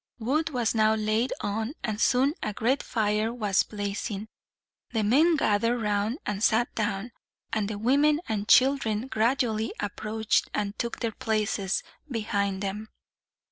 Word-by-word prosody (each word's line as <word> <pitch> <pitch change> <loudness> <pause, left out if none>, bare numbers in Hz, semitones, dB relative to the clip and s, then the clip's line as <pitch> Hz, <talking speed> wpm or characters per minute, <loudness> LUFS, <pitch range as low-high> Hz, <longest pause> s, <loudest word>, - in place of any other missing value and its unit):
Wood 280 +8 0
was 245 -6 0
now 220 -1 +3
laid 215 +3 0
on, 220 +7 -2
and 215 0 -2
soon 265 +3 +3
a 210 - -2
great 245 +7 +1
fire 215 0 0
was 210 -5 +1
blazing. 205 +1 -4 0.6
The 220 -2 +1
men 300 +11 +4
gathered 230 -2 +2
round 210 +3 0
and 210 0 -2
sat 235 +2 +2
down, 210 +1 -2 0.4
and 215 -3 0
the 210 - -4
women 285 +7 +3
and 210 -1 -2
children 250 -4 +4
gradually 225 -2 0
approached, 215 +1 -1
and 205 0 -2
took 235 - -3
their 230 -2 0
places 210 -3 -1 0.3
behind 200 -5 -1
them. 210 +3 -4
220 Hz, 140 wpm, -27 LUFS, 210-240 Hz, 0.6 s, men